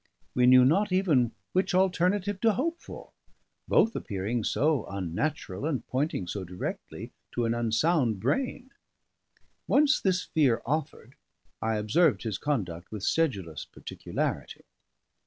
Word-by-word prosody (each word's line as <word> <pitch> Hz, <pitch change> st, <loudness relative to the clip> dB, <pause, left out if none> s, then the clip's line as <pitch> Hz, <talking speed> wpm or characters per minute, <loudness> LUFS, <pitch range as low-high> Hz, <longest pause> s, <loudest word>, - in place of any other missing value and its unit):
We 125 Hz, 0 st, +3 dB
knew 130 Hz, 0 st, +8 dB
not 195 Hz, +9 st, +3 dB
even 155 Hz, -11 st, +3 dB, 0.2 s
which 185 Hz, 0 st, +1 dB
alternative 190 Hz, +2 st, +1 dB
to 225 Hz, -2 st, +4 dB
hope 330 Hz, -, -2 dB
for, -, -, -11 dB, 0.6 s
both 225 Hz, -, +3 dB
appearing 105 Hz, +4 st, -2 dB
so 145 Hz, +1 st, +1 dB
unnatural, 100 Hz, -, -3 dB
and 145 Hz, -6 st, -2 dB
pointing 130 Hz, -, -1 dB
so 95 Hz, +2 st, -4 dB
directly 90 Hz, 0 st, -6 dB, 0.2 s
to 120 Hz, -, 0 dB
an 115 Hz, -, +1 dB
unsound 120 Hz, -, +1 dB
brain. 250 Hz, -, -2 dB, 1.0 s
Once 300 Hz, +1 st, +4 dB
this 185 Hz, -2 st, +1 dB
fear 140 Hz, -8 st, +1 dB
offered, 145 Hz, -3 st, -3 dB, 0.5 s
I 110 Hz, 0 st, 0 dB
observed 110 Hz, +10 st, +2 dB
his 110 Hz, -4 st, -3 dB
conduct 90 Hz, -, -3 dB
with 105 Hz, -3 st, -6 dB
sedulous 100 Hz, -, 0 dB
particularity. -, -, -5 dB
135 Hz, 125 wpm, -28 LUFS, 110-180 Hz, 1.0 s, knew